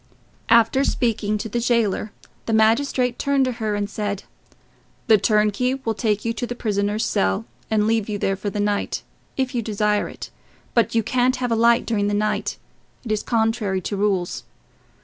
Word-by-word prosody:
After 230 +3 +5
speaking 220 -5 0
to 210 - -4
the 235 +3 -2
jailer, 230 -3 +1 0.4
the 225 - 0
magistrate 240 +3 +2
turned 280 -1 +2
to 255 - 0
her 215 -1 0
and 205 0 -1
said, 205 -1 -3 0.8
"The 220 -4 +5
turnkey 215 +4 +2
will 260 -5 -2
take 215 -1 -1
you 230 - 0
to 245 - -4
the 245 - -5
prisoner's 210 -1 -1
cell 95 - 0 0.2
and 215 -1 +2
leave 225 -1 +1
you 210 - -2
there 195 -1 0
for 200 +2 -4
the 205 - -4
night, 205 0 -1 0.3
if 260 -1 -1
you 240 - 0
desire 210 -1 0
it, - - -9 0.4
but 235 -1 +2
you 225 - +3
can't 255 +3 +2
have 245 -2 -2
a - - +3
light 235 +1 +4
during 205 -3 0
the 205 - 0
night—it 215 +2 -4
is 215 - +1
contrary 220 -4 0
to 200 - -3
rules. 195 -3 0
220 Hz, 180 wpm, -22 LUFS, 205-235 Hz, 0.8 s, After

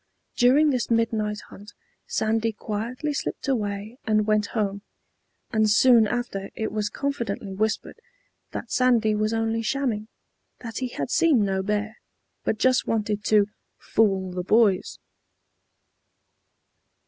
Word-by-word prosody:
During 280 +5 +5
this 250 -3 -1
midnight 225 -2 0
hunt 205 +1 -13 0.3
Sandy 225 +1 0
quietly 230 +8 -4
slipped 280 - -4
away 215 -1 -2
and 215 -1 +2
went 215 -1 +2
home; 200 -2 -1 0.7
and 220 -1 +2
soon 230 +1 +6
after 210 -5 -3
it 220 - -3
was 210 0 -1
confidently 235 -8 -3
whispered, 220 - -2 0.5
that - - -7
Sandy 235 -4 +3
was 215 +1 0
only 225 0 0
shamming, 230 -3 -1 0.5
that 230 -2 -5
he 255 - -2
had 145 - -5
seen 285 -11 +4
no 190 -1 0
bear, 210 +3 -2 0.4
but 215 - 0
just 255 +2 +2
wanted 210 -2 -1
to 210 -2 +4 0.3
"fool 195 -4 +1
the 180 0 -3
boys." 205 0 +2
220 Hz, 125 wpm, -25 LUFS, 210-240 Hz, 0.7 s, soon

